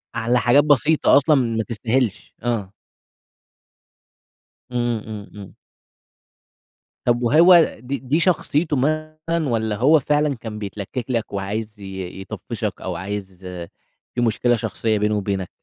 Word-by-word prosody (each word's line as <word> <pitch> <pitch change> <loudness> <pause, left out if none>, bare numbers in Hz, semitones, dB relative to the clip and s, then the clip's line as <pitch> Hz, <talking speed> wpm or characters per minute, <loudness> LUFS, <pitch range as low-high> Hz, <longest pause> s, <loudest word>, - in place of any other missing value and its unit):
على 120 +1 +1
حاجات 125 +5 +5
بسيطة 150 +1 +4
أصلًا 150 +2 +4
ما 115 -4 +1
تستاهلش، 115 0 -2
آه. 110 -5 -2 2.0
إمم، 120 -3 -1
إمم، 105 -2 -7
إمم. 100 -2 -10 1.5
طَب 120 0 +2
وهو 165 +7 +6
دي 135 +3 -4
دي 135 +5 0
شخصيته 155 -3 +1
مثلًا 155 +2 -1
والّا 110 -2 0
هو 145 +8 +5
فعلًا 150 0 +1
كان 110 -2 -7
بيتلكِّك 105 +4 -5
لك 115 -4 -2
وعايز 105 +2 -4
ي - - -11
ي 95 0 -7
يطفِّشك 95 - -5
أو 90 -2 -4
عايز 95 0 -6 0.8
في 120 - 0
مشكلة 120 +1 +2
شخصية 110 -1 -1
بينه 105 0 +1
وبينك؟ 95 -2 -2
120 Hz, 125 wpm, -22 LUFS, 105-145 Hz, 2.0 s, وهو